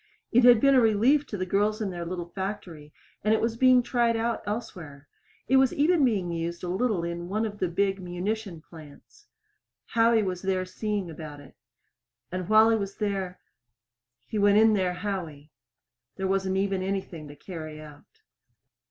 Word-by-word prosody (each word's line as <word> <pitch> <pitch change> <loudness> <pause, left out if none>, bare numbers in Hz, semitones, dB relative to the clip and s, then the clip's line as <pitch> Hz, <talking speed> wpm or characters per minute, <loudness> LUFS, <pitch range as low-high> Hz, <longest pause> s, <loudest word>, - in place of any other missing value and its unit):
It 245 +1 +4
had 245 -2 +8
been 275 +2 +4
a 260 - +6
relief 235 +7 +3
to 205 - -5
the 185 - -2
girls 205 +4 0
in 205 -3 -2
their 175 -1 -5
little 175 -1 -4
factory, 175 -6 -6 0.3
and 215 +1 +3
it - - 0
was 230 0 -1
being 255 0 +5
tried 235 -1 +1
out 230 +1 -1
elsewhere. 175 - -6 0.4
It 265 - +4
was 265 -1 +4
even 310 +2 +3
being 200 -9 +1
used 170 +1 -4
a - - -3
little 190 -1 0
in 170 +1 -5
one 215 +3 -1
of 205 -1 -6
the 185 - +1
big 195 +2 -1
munition 180 0 -4
plants. 160 - -16 0.6
Howie 230 -1 +3
was 185 -2 -3
there 190 -1 -1
seeing 200 -1 -3
about 150 -2 -9
it. 140 -2 -16 0.8
And 185 0 -4
while 220 +1 +6
he 225 - +3
was 200 -1 -5
there 195 -3 -3 0.9
He 215 - -3
went 205 0 +4
in 220 0 +5
there 185 -3 +1
Howie. 170 -7 -5 0.6
There 190 - -4
wasn't 190 0 0
even 195 -1 0
anything 185 -5 -4
to 145 - -11
carry 155 -2 -8
out. 150 -1 -15
195 Hz, 180 wpm, -27 LUFS, 175-220 Hz, 0.9 s, had